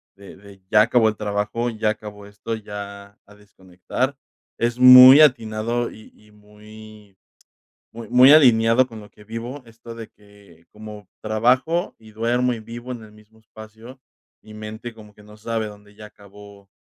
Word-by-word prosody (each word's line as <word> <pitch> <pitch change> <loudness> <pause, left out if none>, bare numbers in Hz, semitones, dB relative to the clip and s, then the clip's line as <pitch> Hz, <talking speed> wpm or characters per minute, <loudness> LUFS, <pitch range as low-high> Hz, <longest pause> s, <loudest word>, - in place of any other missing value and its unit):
de 100 -1 -15
de 100 -1 -18
ya 105 -1 +4
acabó 115 -1 +2
el 110 - -6
trabajo, 105 +3 -3
y 110 - -13
ya 110 - 0
acabó 105 -1 -8
esto, 105 +3 -8
y 110 - -11
ya 100 0 -10
a 105 - -20
desconectar, 105 +6 -6 0.4
es 120 0 -2
muy 125 +2 +9
atinado 115 -3 0
y 110 - -16
y 105 0 -24
muy 105 -1 -17 0.8
muy 115 -2 -10
muy 125 +3 +6
alineado 120 -4 +4
con 115 -3 -12
lo 105 - -16
que 105 - -20
vivo 120 +5 -8
esto 115 0 -13
de 115 -1 -10
que, 100 -5 -23
como 105 -2 -12
trabajo, 125 +10 -1
y 110 -1 -18
duermo 120 +3 -1
y 115 - -9
vivo 120 +3 -11
en 120 -3 -7
el 105 - -17
mismo 105 +1 -23
espacio, 110 +3 -15 0.4
mi 110 - -15
mente 110 +2 -9
como 105 -2 -17
que 105 - -19
no 105 +1 -17
sabe 110 0 -4
dónde 105 0 -15
ya 105 0 -13
acabó 100 -1 -18
110 Hz, 175 wpm, -20 LUFS, 105-115 Hz, 0.8 s, muy